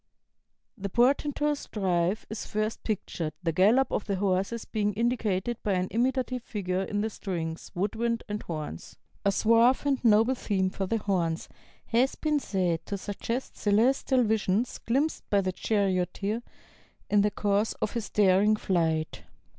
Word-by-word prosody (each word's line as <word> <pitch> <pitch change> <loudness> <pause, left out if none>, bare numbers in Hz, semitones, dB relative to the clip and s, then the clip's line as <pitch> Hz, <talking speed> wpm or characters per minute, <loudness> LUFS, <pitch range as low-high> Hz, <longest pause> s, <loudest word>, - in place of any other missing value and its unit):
" - - -55 0.3
The 200 0 -3
portentous 285 +5 +1
drive 190 0 0
is 220 - -6
first 215 +1 -2
pictured, 170 -7 -3
the 165 - +1
gallop 215 +11 +4
of - - -1
the 200 - -1
horses 195 +4 -1
being 210 -2 -1
indicated 230 -1 0
by 205 - 0
an 185 0 0
imitative 255 +1 0
figure 190 -5 -2
in 205 +1 -2
the 220 - -1
strings, 165 -5 -4
wood 195 +3 -1
wind, 230 0 -1
and 210 0 -3
horns. 155 - -6 0.3
A 200 - +3
suave 230 +6 +4
and 275 -3 +1
noble 225 +2 +5
theme 190 -6 -1
for 195 0 -3
the 225 - +1
horns 180 -6 -1 0.4
has 245 +4 +2
been 305 -1 0
said 180 - -1
to 200 - -2
suggest 230 +6 -4
celestial 250 +5 +3
visions 220 +1 0
glimpsed 275 +7 -1
by 200 - +3
the 185 -1 -1
charioteer 200 +2 0 0.7
in 205 -1 +4
the 210 - +3
course 205 +1 0
of - - -3
his 235 -4 -4
daring 205 +1 +4
flight. 165 -6 0
210 Hz, 155 wpm, -28 LUFS, 185-235 Hz, 0.7 s, noble